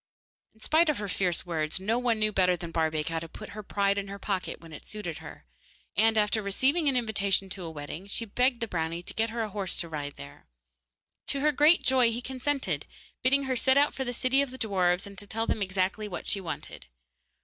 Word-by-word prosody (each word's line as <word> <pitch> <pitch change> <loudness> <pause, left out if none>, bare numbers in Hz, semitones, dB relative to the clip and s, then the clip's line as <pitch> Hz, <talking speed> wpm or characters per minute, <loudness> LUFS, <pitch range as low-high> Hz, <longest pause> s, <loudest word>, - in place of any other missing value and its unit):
In 220 - -25
spite 320 +5 +3
of 300 - +1
her 205 - -4
fierce 180 -2 0
words, 160 0 -1
no 220 +5 0
one 240 -2 +1
knew 215 0 +2
better 180 -3 +3
than 170 0 -7
Barbaik 160 -2 0
how 165 0 -1
to 165 0 -8
put - - -10
her 215 - -7
pride 200 0 +1
in 200 - -5
her 200 0 -6
pocket 195 -2 -3
when 165 -1 -13
it - - -11
suited 205 -7 -5
her, - - -11 0.5
and 220 +1 +4
after 215 +1 +2
receiving 270 - +2
an 265 - +2
invitation 200 -4 +1
to 185 -1 -3
a - - -4
wedding, 155 +4 -7
she 230 +3 0
begged 250 +3 +1
the 230 - -1
brownie 165 -2 -2
to - - -7
get 225 +1 +1
her 230 0 -2
a 215 - -4
horse 195 -3 -2
to 170 - -7
ride 145 -2 -5
there. 70 0 -12 0.8
To 275 - +1
her 300 +1 +4
great 300 +4 +5
joy 255 -3 +4
he 230 - -2
consented, 265 +2 -2 0.3
bidding 275 +2 +4
her 265 -1 -1
set 265 +2 +3
out 290 +1 +4
for 265 - -3
the 245 - -3
city 255 +3 +3
of 280 - -1
the 260 - -9
dwarfs 185 -5 +1
and 200 -1 -8
to 205 - -5
tell 225 +2 -1
them 215 - -1
exactly 190 +2 0
what 185 - -6
she 200 - 0
wanted. 155 - -7
205 Hz, 235 wpm, -28 LUFS, 180-245 Hz, 0.8 s, great